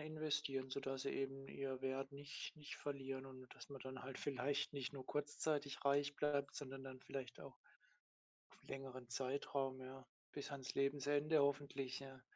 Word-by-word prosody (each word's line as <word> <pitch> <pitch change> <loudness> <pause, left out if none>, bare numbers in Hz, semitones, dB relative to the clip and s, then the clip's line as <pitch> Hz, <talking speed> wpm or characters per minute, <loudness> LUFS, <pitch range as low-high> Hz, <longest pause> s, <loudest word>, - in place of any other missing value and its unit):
investieren, 150 -3 +1
sodass 135 -1 0
sie - - +1
eben 135 0 -1
ihr 135 -2 -2
Wert 135 +1 +1
nicht 145 +3 -5
nicht 150 -1 -5
verlieren 135 -2 -2
und 130 -1 -9
dass - - -9
man 140 -2 -6
dann 130 0 -5
halt 130 0 -4
vielleicht 140 +1 +2
nicht 140 -2 -1
nur 135 -2 -5
kurzzeitig 145 -1 +1
reich 145 +1 +5
bleibt, 145 -1 +3
sondern 135 -1 -4
dann 130 -1 -6
vielleicht 130 -2 -4
auch - - -8 0.9
f - - -19
längeren 130 -2 -4
Zeitraum, 135 +1 +1
ja 130 0 -6 0.3
bis 145 - -3
ans 135 -2 -3
Lebensende 145 +2 +5
hoffentlich, 140 -2 +2
ja. 135 -1 -8
135 Hz, 160 wpm, -44 LUFS, 130-145 Hz, 0.9 s, reich